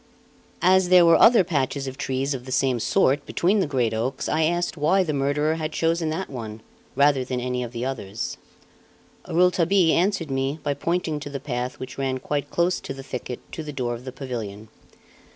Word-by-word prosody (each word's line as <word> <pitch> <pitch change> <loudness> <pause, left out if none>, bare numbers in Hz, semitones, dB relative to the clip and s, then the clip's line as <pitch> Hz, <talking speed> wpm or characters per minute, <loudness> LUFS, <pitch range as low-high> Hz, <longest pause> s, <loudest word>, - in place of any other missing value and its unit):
As 185 0 +4
there 180 -1 +7
were 165 0 +7
other 230 -4 +7
patches 140 -4 -1
of 130 -1 -5
trees 135 +2 -2
of 125 -2 -6
the 130 - -8
same 130 -1 +1
sort 140 +5 +2
between 195 +5 +1
the 190 - +1
great 125 -5 0
oaks, 125 +5 -2
I 155 0 +2
asked 175 0 0
why 170 +5 +3
the 155 -4 -2
murderer 145 +3 0
had 155 -1 -3
chosen 165 0 0
that 165 +5 -3
one, 110 -4 -7 0.3
rather 140 -1 +4
than 125 0 -3
any 125 0 -2
of 120 -2 -5
the 120 0 -4
others. 115 -5 -4 0.9
Rouletabille 180 0 +3
answered 180 -4 0
me 135 +2 -1
by 145 - 0
pointing 165 0 -1
to 145 - -7
the 140 -1 -5
path 125 -2 -4
which 130 +1 -8
ran 135 -1 -1
quite 145 +2 -3
close 175 +1 +1
to 135 - -7
the 135 - -9
thicket 125 -2 -6
to - - -5
the 150 -1 -6
door 125 -4 -2
of 120 +1 -8
the 130 - -5
pavilion. 115 -6 -6
140 Hz, 200 wpm, -24 LUFS, 130-165 Hz, 0.9 s, there